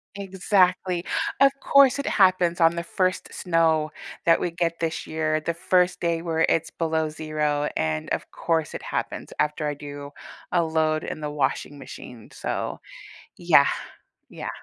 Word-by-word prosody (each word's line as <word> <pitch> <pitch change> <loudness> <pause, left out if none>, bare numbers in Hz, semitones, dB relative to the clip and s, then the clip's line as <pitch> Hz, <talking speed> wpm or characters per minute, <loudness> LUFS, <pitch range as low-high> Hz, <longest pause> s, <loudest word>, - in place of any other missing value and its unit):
Exactly, 185 -2 +1 0.3
of 275 0 +6
course 280 -2 +5
it 280 - -3
happens 185 -3 +3
on 165 0 +5
the 170 - -3
1st 185 +2 -1
snow 160 -3 +1 0.3
that 165 0 +4
we 175 - -1
get 170 -1 -1
this 165 -1 -2
year, 155 0 0
the 170 +2 -2
1st 180 +1 +1
day 170 -1 0
where 165 -1 +1
it's 165 - +1
below 160 -1 -1
0, 150 -1 -1
and, 80 0 -1
of - - -3
course, 160 -2 -1
it - - -5
happens - - -4
after 150 0 0
I 145 - -1
do 145 0 -8 0.4
a 175 - +3
load 155 -1 0
in 155 - -5
the 150 0 -3
washing 145 0 -2
machine, 125 -3 -11
so - - -3 0.6
yeah, - - +5 0.6
yeah. - - -6
165 Hz, 155 wpm, -25 LUFS, 155-180 Hz, 0.6 s, of